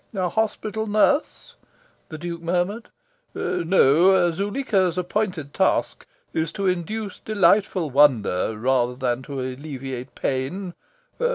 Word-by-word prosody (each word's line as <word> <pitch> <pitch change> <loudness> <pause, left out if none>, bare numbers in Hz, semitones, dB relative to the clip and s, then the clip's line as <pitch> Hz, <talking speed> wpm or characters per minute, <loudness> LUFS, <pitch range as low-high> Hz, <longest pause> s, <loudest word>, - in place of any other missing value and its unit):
"A 185 -2 0
hospital 220 0 -2
nurse?" 215 +8 +1 0.6
the 160 - -7
Duke 170 +1 -6
murmured. 180 +7 -1 0.5
"No, 175 +1 +3
Zuleika's 195 -2 0
appointed 180 -5 -2
task - - 0 0.3
is 160 0 -1
to 200 - -3
induce 195 +3 -2
delightful 190 -5 +2
wonder 115 -7 +3
rather 125 +1 +1
than 125 -1 -1
to 140 0 -6
alleviate 130 -1 -6
pain. 160 +8 -3
175 Hz, 105 wpm, -23 LUFS, 135-200 Hz, 0.6 s, No